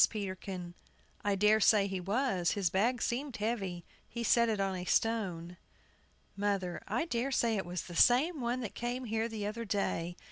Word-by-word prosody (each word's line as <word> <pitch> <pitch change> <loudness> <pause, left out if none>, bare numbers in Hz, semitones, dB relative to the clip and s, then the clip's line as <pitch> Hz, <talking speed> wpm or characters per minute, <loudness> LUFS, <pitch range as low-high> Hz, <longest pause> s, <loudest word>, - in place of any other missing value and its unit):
PETERKIN. 190 -3 -5 0.5
I 205 -1 +1
dare 210 +2 +4
say 210 -1 +5
he 190 -1 -3
was; 195 -2 0
his 195 -5 0
bag 230 +5 +1
seemed 255 +1 -2
heavy. 195 -6 -2 0.2
He 235 - -4
set 235 0 +4
it 215 -2 0
on 195 -1 0
a 180 - -4
stone. 180 -5 0 0.8
MOTHER. 195 -3 -1
I 330 - 0
dare 255 -3 -1
say 235 -3 +2
it 190 -4 -3
was 175 -1 -3
the 175 - -9
same 275 - +4
one 245 +2 -1
that 220 - -5
came 245 +2 -3
here 225 0 -1
the 215 -2 -4
other 215 +3 -3
day. 180 -4 -2
210 Hz, 180 wpm, -32 LUFS, 190-235 Hz, 0.8 s, say